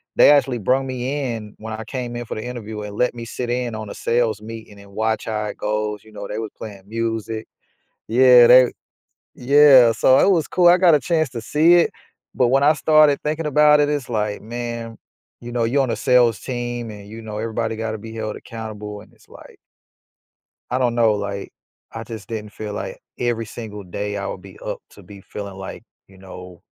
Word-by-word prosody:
They - - +7
actually 135 -4 +3
brung 130 +5 +1
me 130 0 -3
in 105 -2 -8
when 110 0 -7
I 110 0 -6
came 125 0 -5
in 120 - -5
for - - -6
the 110 - -5
interview 110 -3 -6
and 105 -1 -7
let 125 0 +1
me 120 - -7
sit 120 +1 -5
in 120 -1 -2
on 110 -1 -6
a - - -8
sales 115 -3 0
meeting 110 -1 -10
and 100 0 -15
watch 110 +2 -1
how 110 -1 -2
it 105 - -5
goes, 105 0 -2
you 110 - -18
know, 100 -1 -7
they 105 - -4
was 110 -1 -4
playing 100 -3 -9
music. 115 -1 -3 0.6
Yeah, 125 0 +7
they, 125 0 +7 0.6
yeah, 135 -2 +6
so 130 +4 +4
it - - +4
was 165 -6 +2
cool. 180 -1 +4
I 175 - +7
got 180 -3 +5
a 150 - +3
chance 160 +2 0
to 120 - -6
see 155 +9 +4
it, 175 - +3 0.4
but, 125 - +2
when 135 +3 +3
I 150 +2 +5
started 155 -2 +4
thinking 155 +1 -2
about 150 0 +5
it 145 - +2
it's 145 -3 -2
like, 105 -3 -2
man, 115 0 -6 0.4
you 120 - -8
know, 120 -1 0
you're 135 +5 +2
on 130 - -2
a 115 - -1
sales 125 -4 +3
team 120 -2 -4
and 100 -1 -11
you 110 +2 -9
know, 105 -1 -6
everybody 110 0 -2
got 110 0 -3
to 110 - -5
be 110 +1 -10
held 110 -1 -4
accountable, 105 -2 -8
and 105 - -18
it's, - - -25
like - - -15 1.1
I 125 - +1
don't 125 -2 +1
know, 115 -2 +4
like, 100 -1 -5 0.4
I 115 - -6
just 110 -3 -9
didn't 105 -2 -6
feel 105 0 -7
like - - -6 0.2
every 120 -2 -1
single 105 -2 -8
day 100 +3 -4
I 100 - -4
would 95 -1 -5
be 95 0 -14
up - - -4
to - - -16
be 100 +2 -13
feeling, 100 0 -8
like, 95 0 -8 0.2
you 95 - -19
know, 90 -1 -12
115 Hz, 215 wpm, -21 LUFS, 105-125 Hz, 1.1 s, They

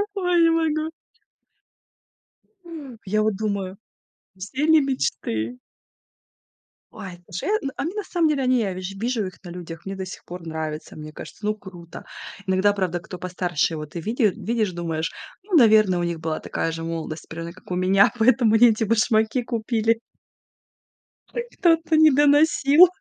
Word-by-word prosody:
Ой, 360 -3 +2
не 330 - +5
могу! 320 -1 0 2.1
Я 215 +2 +1
вот 215 -2 +1
думаю, 200 -2 -3 0.6
все 230 +10 -4
они 315 -1 +6
мечты 125 - -2 1.3
Ой, 185 -3 -8
слушай, 175 - -5
я 280 -10 -1
а - - -2
мне, 355 +6 -4
на 420 - -2
самом 340 -3 +1
деле, 285 -3 +1
они 255 -1 +3
я 195 -4 -1
ви 185 - -6
же 195 +2 -6
вижу 230 -3 -1
их 185 - -7
на - - -7
людях, 170 -1 -9
мне 195 0 -5
до 190 -1 -5
сих 185 - -10
пор 175 -1 -9
нравится. 155 -1 -5
Мне 155 0 -9
кажется, 210 - -10
ну, 215 0 +1
круто. 175 -5 -11 0.4
Иногда, 190 +2 +3
правда, 180 -3 -1
кто 180 0 -9
постарше, 175 -3 -1
и - - -5
вот 150 0 -7
ты 170 - -5
види 230 - -2
э, 205 - +5
видишь, 220 -5 -1
думаешь: 165 -2 -3 0.3
"Ну, 390 -3 -2
наверное, 215 - +5
у - - -1
них 170 -1 -2
была 160 -1 -3
такая 165 - -2
же 165 0 -5
молодость, 165 -1 -5
примерно 165 +1 -6
как 185 - -15
у - - 0
меня, 190 +2 +4
поэтому 230 -1 +4
они 240 +2 +7
эти 220 +1 -1
башмаки 220 +2 +2
купили". 230 -1 0 1.3
Опять 475 0 -6
кто-то 330 -3 +3
не 315 0 +7
доносил. 290 +3 +6
205 Hz, 170 wpm, -23 LUFS, 175-260 Hz, 2.1 s, они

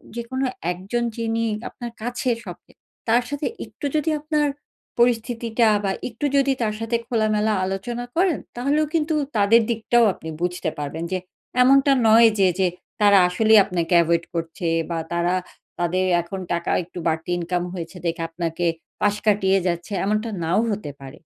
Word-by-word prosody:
যেকোনো 260 +3 -3 0.3
একজন 195 +7 -3
যিনি 230 0 -1 0.3
আপনার 240 -1 -8
কাছে 245 +2 -2
সব - - -7
চেয়ে - - -25 0.3
তার 235 +2 +4
সাথে 285 0 -2 0.2
একটু - - -9
যদি 305 +1 +1
আপনার 300 0 0 0.5
পরিস্থিতিটা 235 -1 +2 0.2
বা 195 - +1 0.2
একটু 235 +5 -4
যদি 275 0 +3
তার 215 -2 0
সাথে 225 +1 -1
খোলামেলা 215 -2 +1
আলোচনা 215 +6 -4
করেন, 355 -2 +2 0.2
তাহলেও 280 +5 +1
কিন্তু 315 -1 +1 0.2
তাদের 210 +3 +5
দিকটাও 235 +1 +2
আপনি 160 - -9
বুঝতে 180 -1 -1
পারবেন। 150 +3 -4
যে 185 - +1 0.5
এমনটা 275 +2 +5 0.2
নয় 225 +1 +7
যে, 190 - +5
যে 190 - +4 0.3
তারা 205 -1 +6
আসলেই 215 +4 +5
আপনাকে 175 0 -2
এভয়েড 170 0 +1
করছে 165 +1 -3 0.2
বা 165 - -1
তারা 170 +1 +1 0.4
তাদের 180 +2 +1 0.2
এখন 175 +3 -7
টাকা 170 0 -1
একটু 175 +1 -9
বাড়তি 160 +1 -1
ইনকাম 175 +1 -2
হয়েছে 175 0 -7
দেখে 165 0 -1
আপনাকে 170 0 -2 0.4
পাশ 205 0 +3
কাটিয়ে 195 -2 +3
যাচ্ছে 175 +4 -3
এমনটা 215 +3 0
নাও 165 +5 +2
হতে 205 -7 -4
পারে। 135 0 -10
210 Hz, 160 wpm, -23 LUFS, 175-240 Hz, 0.5 s, নয়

